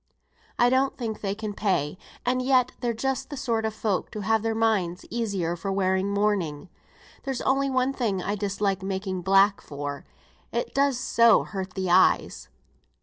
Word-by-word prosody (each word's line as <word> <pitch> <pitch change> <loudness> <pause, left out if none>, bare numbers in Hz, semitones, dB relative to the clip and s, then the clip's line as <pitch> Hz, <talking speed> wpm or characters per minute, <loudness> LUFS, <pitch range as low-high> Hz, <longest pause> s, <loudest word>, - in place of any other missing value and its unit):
I 245 0 +4
don't 265 +1 +2
think 225 -4 -4
they 195 -1 -2
can 215 -1 -5
pay, 185 -8 0 0.3
and 255 +1 +1
yet 255 -1 +3
they're 240 -2 0
just 265 +3 -2
the 285 - -6
sort 230 -4 -1
of 220 - -2
folk 210 -3 -1
to 215 - -4
have 220 +2 +2
their 225 0 -1
minds 205 -6 0
easier 200 -8 -1
for 195 +3 -4
wearing 190 0 +1
mourning. 200 -6 -1 0.5
There's 270 -3 -3
only 275 +1 +1
one 260 0 +1
thing 220 -8 -1
I 200 +3 -2
dislike 200 -1 -1
making 190 -1 -3
black 195 +2 +4
for, 145 -1 -6 0.5
it - - -2
does 275 -2 +2
so 235 -2 +4
hurt 190 -2 -6
the 185 -2 -1
eyes." 185 +1 +3
210 Hz, 170 wpm, -26 LUFS, 190-245 Hz, 0.5 s, I